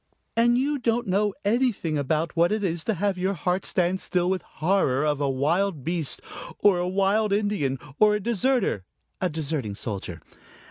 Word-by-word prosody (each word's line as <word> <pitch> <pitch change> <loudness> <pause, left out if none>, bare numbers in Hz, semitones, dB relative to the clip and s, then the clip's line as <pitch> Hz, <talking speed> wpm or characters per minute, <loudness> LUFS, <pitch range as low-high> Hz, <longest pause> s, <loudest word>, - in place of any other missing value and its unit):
And 240 +1 +4
you 285 +3 0
don't 235 0 0
know 200 +1 +1
anything 220 -8 +1
about 155 +4 -1
what 170 +2 +3
it 215 -1 0
is 170 -3 -1
to 220 - 0
have 195 +1 -1
your 190 +2 0
heart 180 +3 -1
stand 180 +1 +1
still 180 -1 0
with 190 -2 -1
horror 155 -5 0
of 150 -1 0
a 140 - +1
wild 155 +4 0
beast 165 -2 -2 0.4
or 200 -4 +4
a 175 - -1
wild 200 +3 +1
Indian 200 -10 0 0.2
or 210 -1 +5
a - - -1
deserter 235 - 0 0.4
a 185 - +1
deserting 150 -9 -3
soldier. 95 -6 -5
185 Hz, 175 wpm, -25 LUFS, 155-210 Hz, 0.4 s, or